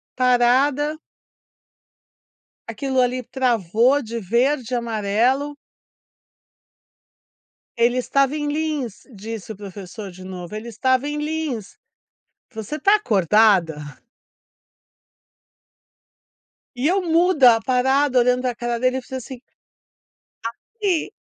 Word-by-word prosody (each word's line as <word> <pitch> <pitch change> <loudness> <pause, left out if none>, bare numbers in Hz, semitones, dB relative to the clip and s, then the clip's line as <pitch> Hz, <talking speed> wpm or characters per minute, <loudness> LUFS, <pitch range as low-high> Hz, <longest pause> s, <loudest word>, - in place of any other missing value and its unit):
parada. 260 +4 +2 1.7
Aquilo 260 +4 -1
ali 250 0 0
travou 245 +1 +1
de 230 -2 -5
verde 240 +5 0
e - - +2
amarelo. 235 +5 0 2.2
Ele 240 +2 +2
estava 275 +3 +1
em 295 -1 -2
lins, 295 -8 -3
disse 220 +2 -7
o - - -7
professor 195 0 -9
de 185 +1 -12
novo, 185 +1 -8
ele 215 +2 -6
estava 260 +4 0
em 295 0 -3
lins. 300 -8 -4 0.8
Você 220 +7 -5
tá 395 +8 +4
acordada? 200 - +3 3.0
E 250 +2 -3
eu 380 +3 +2
muda, 325 -9 +4
parada 265 +2 +2
olhando 250 +1 +2
pra 250 -2 -2
cara 240 0 -3
dele, 255 +1 +1
eu - - -4
fiz 245 - -22
assim 255 -1 -7 1.1
Aqui! 390 - -3
250 Hz, 100 wpm, -21 LUFS, 220-285 Hz, 3.0 s, tá